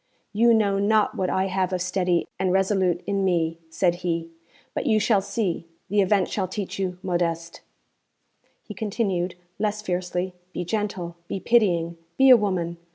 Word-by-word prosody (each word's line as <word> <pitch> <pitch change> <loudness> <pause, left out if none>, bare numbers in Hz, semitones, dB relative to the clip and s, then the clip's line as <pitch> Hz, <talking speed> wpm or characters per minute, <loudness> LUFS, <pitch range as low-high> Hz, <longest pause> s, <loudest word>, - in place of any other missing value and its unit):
'You 235 +3 +5
know 205 -3 +3
not 210 +1 +3
what 185 -1 -1
I 190 - +1
have 190 -1 0
of 185 - -1
steady 180 -1 +1
and 185 - +1
resolute 190 -2 +1
in 200 -1 0
me,' 165 -3 +1
said 175 +2 +1
he, 170 -2 -2 0.4
'but - - -2
you 215 -1 +4
shall 210 -2 +3
see; 195 -4 -2 0.2
the 205 +1 +3
event 195 -1 +2
shall 190 -3 -2
teach 195 +1 -5
you. 185 -2 -2
Modeste,' 170 -2 -2 1.0
he 210 - -8
continued, 195 -4 -1 0.2
less 210 0 -1
fiercely, 180 -1 -2 0.2
'be 175 - -3
gentle, 190 -4 -3
be 195 - -3
pitying, 175 -8 +2 0.2
be 265 0 +7
a - - +11
woman. 185 -6 -1
190 Hz, 160 wpm, -24 LUFS, 175-205 Hz, 1.0 s, a